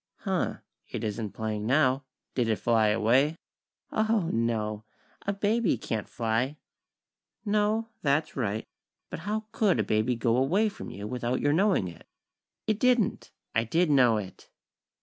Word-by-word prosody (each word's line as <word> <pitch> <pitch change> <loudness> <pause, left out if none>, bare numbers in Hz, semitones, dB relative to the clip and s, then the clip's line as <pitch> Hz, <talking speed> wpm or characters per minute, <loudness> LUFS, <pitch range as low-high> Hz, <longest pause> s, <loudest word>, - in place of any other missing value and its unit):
"Huh, - - -1 0.3
it - - -4
isn't 105 -1 -3
playing 110 -1 -3
now. 130 0 +3 0.3
Did 125 -3 +1
it 110 - +3
fly 110 +2 +2
away?" 120 +8 +3 0.6
"Oho! 220 0 +2
No! 110 -2 -1 0.4
A - - +3
baby 205 - +1
can't 110 -1 -4
fly!" 120 +5 -1 0.9
"No. 215 +2 +1
That's 150 +2 +1
right. 110 -4 -2 0.5
But - - -4
how 210 +5 -3
could 200 - +2
a - - +3
baby 110 +4 +1
go 115 +1 +1
away 185 +12 +3
from 200 - -8
you 100 - -7
without 125 +2 -1
your 145 0 +2
knowing 190 - +3
it?" 85 - -11 0.6
"It 215 -1 0
didn't. 250 -5 +2 0.2
I 115 - +2
did 160 +8 +2
know 125 -5 +5
it." 95 -3 -8
125 Hz, 150 wpm, -28 LUFS, -, 0.9 s, know